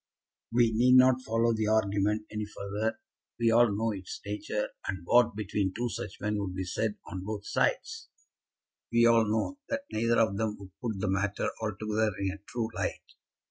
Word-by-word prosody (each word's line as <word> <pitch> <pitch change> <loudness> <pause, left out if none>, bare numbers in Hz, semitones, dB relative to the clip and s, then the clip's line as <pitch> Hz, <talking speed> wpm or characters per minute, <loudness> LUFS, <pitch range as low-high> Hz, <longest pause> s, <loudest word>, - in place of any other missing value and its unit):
We 120 -1 +4
need 125 +3 +5
not 130 0 +6
follow 115 -1 +1
the 110 -1 0
argument 105 0 +1
any 105 0 -3
further. 105 +2 -3 0.4
We 115 -1 +3
all 120 -1 +5
know 110 +3 0
its 95 -3 -6
nature, 105 +1 -3 0.2
and 95 -3 -4
what 120 +1 +4
between 100 -2 -1
two 120 +1 -1
such 95 - -6
men 105 0 -1
would 95 -2 -3
be 95 - -2
said 105 +4 -1
on 95 -3 -6
both 105 0 -5
sides. 450 -2 -1 0.8
We 115 0 +5
all 115 -1 +5
know 110 - -1
that 280 0 -2
neither 115 +2 +2
of 110 -3 +2
them 110 -1 -1
would 95 -1 -12
put 110 -5 -3
the - - -1
matter 100 +1 0
altogether 110 0 -1
in 95 -1 -1
a 100 - -9
true 115 -2 -2
light. - - -4
110 Hz, 180 wpm, -29 LUFS, 100-115 Hz, 0.8 s, not